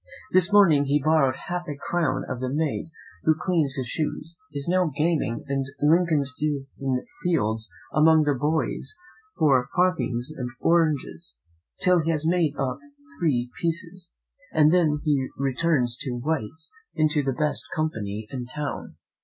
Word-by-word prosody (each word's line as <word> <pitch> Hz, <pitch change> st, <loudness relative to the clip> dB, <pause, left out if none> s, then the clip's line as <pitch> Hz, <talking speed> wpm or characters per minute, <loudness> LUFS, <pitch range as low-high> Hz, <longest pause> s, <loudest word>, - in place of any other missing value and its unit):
This 185 Hz, +1 st, +6 dB
morning 170 Hz, -9 st, +6 dB
he 145 Hz, +2 st, +2 dB
borrowed 145 Hz, -3 st, +3 dB
half 175 Hz, 0 st, -3 dB
a 145 Hz, -2 st, -5 dB
crown 155 Hz, -3 st, -1 dB
of 130 Hz, -, -4 dB
the 130 Hz, 0 st, -2 dB
maid 150 Hz, +3 st, -1 dB, 0.3 s
who 155 Hz, -, +3 dB
cleans 155 Hz, -6 st, +1 dB
his 130 Hz, -3 st, -2 dB
shoes, 160 Hz, +4 st, -3 dB
and -, -, -6 dB
is 140 Hz, -, -2 dB
now 180 Hz, 0 st, +3 dB
gaming 150 Hz, -7 st, 0 dB
in 135 Hz, -1 st, 0 dB, 0.2 s
Lincoln's 155 Hz, -3 st, +3 dB
Inn 135 Hz, -3 st, -2 dB, 0.2 s
Fields 110 Hz, -, 0 dB, 0.2 s
among 160 Hz, 0 st, +5 dB
the 145 Hz, -1 st, +2 dB
boys 150 Hz, -, -1 dB, 0.4 s
for 130 Hz, -5 st, +3 dB
farthings 140 Hz, -8 st, +1 dB
and 125 Hz, -3 st, -4 dB
oranges, 145 Hz, -, +1 dB, 0.4 s
till 180 Hz, -3 st, +4 dB
he 160 Hz, -, -2 dB
has 155 Hz, -2 st, 0 dB
made 165 Hz, -4 st, +2 dB
up 130 Hz, -1 st, -2 dB, 0.4 s
three 125 Hz, -7 st, 0 dB
pieces, 170 Hz, +1 st, -2 dB, 0.4 s
and 155 Hz, -1 st, +5 dB
then 155 Hz, -4 st, +3 dB
he 140 Hz, -3 st, +1 dB
returns 135 Hz, -2 st, +1 dB
to 125 Hz, -3 st, -3 dB
White's 155 Hz, -, -3 dB, 0.2 s
into 155 Hz, -2 st, +2 dB
the 135 Hz, -1 st, -1 dB
best 150 Hz, -6 st, -1 dB
company 110 Hz, -9 st, -2 dB
in 125 Hz, -2 st, -5 dB
town." 145 Hz, +2 st, -5 dB
150 Hz, 150 wpm, -25 LUFS, 130-165 Hz, 0.4 s, This